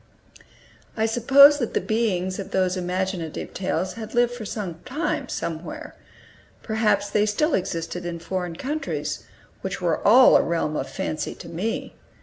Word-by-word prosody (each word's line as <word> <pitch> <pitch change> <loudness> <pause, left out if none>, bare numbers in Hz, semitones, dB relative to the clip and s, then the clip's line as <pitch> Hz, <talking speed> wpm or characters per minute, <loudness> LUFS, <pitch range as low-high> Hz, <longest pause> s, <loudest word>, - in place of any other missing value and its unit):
I 220 - +2
supposed 275 +6 +7
that 240 - -3
the - - +4
beings 190 -5 -1
of 195 - -5
those 185 -1 +1
imaginative 180 -2 -3
tales 185 -1 -2
had 225 0 -8
lived 240 -2 +1
some 185 -6 -5
time, 295 -1 -2
somewhere; 180 - -5 0.7
perhaps 210 -2 +1
they 210 +1 +2
still 300 +9 +1
existed 175 -1 -2
in 175 -1 -4
foreign 180 0 -4
countries, 295 - -3 0.4
which 190 0 -4
were 170 -3 0
all 250 +5 +7
a - - +3
realm 165 -2 -1
of - - -3
fancy 155 -1 -3
to - - -11
me. 180 +7 -3
195 Hz, 145 wpm, -24 LUFS, 175-235 Hz, 0.7 s, supposed